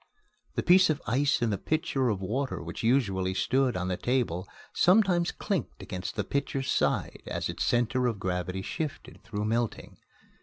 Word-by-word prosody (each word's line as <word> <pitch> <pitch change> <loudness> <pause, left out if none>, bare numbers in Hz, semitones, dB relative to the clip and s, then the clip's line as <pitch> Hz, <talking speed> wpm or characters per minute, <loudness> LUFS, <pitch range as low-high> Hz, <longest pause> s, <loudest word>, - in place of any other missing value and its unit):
The - - 0
piece 185 0 +6
of 155 - +1
ice 130 +2 +2
in 115 - +1
the 100 - -1
pitcher 135 -4 0
of 100 -3 -1
water 130 +7 -2
which - - -6
usually 100 -7 +1
stood 130 +1 +1
on 90 0 -2
the 90 -1 -1
table 110 -8 0 0.3
sometimes 180 -2 +4
clinked 195 - -3
against 90 -1 -5
the 105 - 0
pitcher's 135 +3 -2
side - - 0
as - - -2
its - - -2
center 125 +1 +2
of 115 -4 -1
gravity 90 0 -2
shifted 155 +6 -5
through 105 -2 -3
melting. 115 +1 -2
120 Hz, 165 wpm, -28 LUFS, 95-140 Hz, 0.3 s, piece